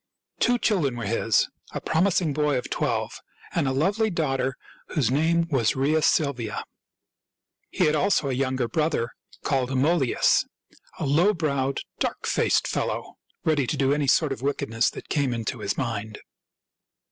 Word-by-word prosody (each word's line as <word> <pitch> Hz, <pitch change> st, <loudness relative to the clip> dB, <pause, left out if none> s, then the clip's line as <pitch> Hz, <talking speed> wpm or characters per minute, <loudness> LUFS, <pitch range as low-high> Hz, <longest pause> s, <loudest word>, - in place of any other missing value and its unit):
Two 245 Hz, 0 st, +3 dB
children 175 Hz, -, +1 dB
were 115 Hz, -, -4 dB
his 115 Hz, +1 st, +2 dB
— -, -, -25 dB
a -, -, -1 dB
promising 170 Hz, -2 st, +1 dB
boy 150 Hz, -1 st, +1 dB
of 125 Hz, -, -5 dB
twelve -, -, -2 dB, 0.3 s
and 140 Hz, -, +1 dB
a -, -, +1 dB
lovely 200 Hz, +11 st, +1 dB
daughter 135 Hz, -7 st, -1 dB, 0.3 s
whose 130 Hz, -7 st, 0 dB
name 165 Hz, +4 st, +2 dB
was 120 Hz, -6 st, +2 dB
Rhea 145 Hz, +4 st, +2 dB
Silvia. 140 Hz, -8 st, 0 dB, 1.1 s
He 185 Hz, -, +1 dB
had 150 Hz, -, +3 dB
also 155 Hz, 0 st, +2 dB
a 135 Hz, -, -1 dB
younger 130 Hz, -1 st, 0 dB
brother 150 Hz, -6 st, 0 dB, 0.3 s
called 130 Hz, -3 st, 0 dB
Amulius, 135 Hz, +1 st, +3 dB, 0.5 s
a -, -, -3 dB
low 170 Hz, +9 st, +3 dB
browed, 140 Hz, -4 st, -1 dB, 0.2 s
dark -, -, -2 dB
faced -, -, +2 dB
fellow, -, -, -3 dB, 0.2 s
ready 150 Hz, -5 st, +1 dB
to -, -, -1 dB
do 135 Hz, 0 st, +2 dB
any 145 Hz, -1 st, 0 dB
sort 150 Hz, +2 st, +3 dB
of 135 Hz, -, -4 dB
wickedness 115 Hz, -4 st, 0 dB
that -, -, -10 dB
came 140 Hz, -5 st, 0 dB
into 115 Hz, +2 st, -3 dB
his 100 Hz, -1 st, -2 dB
mind. 110 Hz, -4 st, -3 dB
140 Hz, 160 wpm, -25 LUFS, 125-160 Hz, 1.1 s, Two